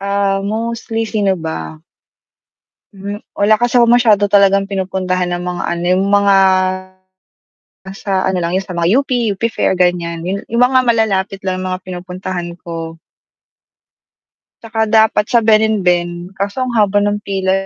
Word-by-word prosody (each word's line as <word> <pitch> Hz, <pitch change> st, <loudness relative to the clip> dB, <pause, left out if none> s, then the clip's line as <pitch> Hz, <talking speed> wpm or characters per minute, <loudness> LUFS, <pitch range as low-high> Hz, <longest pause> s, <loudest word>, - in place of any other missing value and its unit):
ah, 200 Hz, 0 st, 0 dB
mostly, 225 Hz, +2 st, -3 dB
sino 205 Hz, -3 st, 0 dB
ba? 80 Hz, -, -6 dB, 1.2 s
Hmm, 200 Hz, +1 st, -6 dB, 0.2 s
wala 210 Hz, +2 st, +3 dB
kasi 240 Hz, +2 st, +2 dB
ako 235 Hz, -, +4 dB
masyado 220 Hz, -4 st, +4 dB
talagang 195 Hz, -1 st, +3 dB
pinupuntahan 185 Hz, -2 st, -2 dB
na 175 Hz, -, -2 dB
mga 180 Hz, 0 st, -4 dB
ano, 175 Hz, 0 st, -3 dB
'yung 190 Hz, -, +1 dB
mga, 200 Hz, -1 st, +4 dB, 1.5 s
nasa 195 Hz, +1 st, -6 dB, 0.2 s
ano 190 Hz, -, -1 dB
lang 170 Hz, -, -2 dB
'yun 190 Hz, +1 st, -1 dB
sa 180 Hz, -2 st, -8 dB
mga 170 Hz, 0 st, +1 dB
UP, 280 Hz, -, -8 dB, 0.2 s
UP 195 Hz, +2 st, -10 dB
Fair -, -, 0 dB
ganiyan. 170 Hz, -2 st, 0 dB
'Yun 200 Hz, +1 st, -3 dB
'yun 235 Hz, +1 st, -2 dB
mga 255 Hz, +1 st, +4 dB
malalapit 205 Hz, -5 st, 0 dB
lang 185 Hz, -1 st, -2 dB
'yung 185 Hz, -, -3 dB
mga 185 Hz, -, -4 dB
pinupuntahan 180 Hz, -1 st, -5 dB
ko. 165 Hz, -1 st, -7 dB, 1.6 s
'Tsaka 225 Hz, -1 st, -5 dB, 0.2 s
dapat 220 Hz, -1 st, +3 dB
sa 235 Hz, -, +5 dB
Ben&Ben, 205 Hz, -6 st, +2 dB, 0.3 s
kaso 200 Hz, +3 st, -3 dB
ang 255 Hz, -, -2 dB
haba 205 Hz, -1 st, +3 dB
ng 205 Hz, 0 st, 0 dB
pila, 190 Hz, -1 st, -1 dB
195 Hz, 150 wpm, -16 LUFS, 180-215 Hz, 1.6 s, sa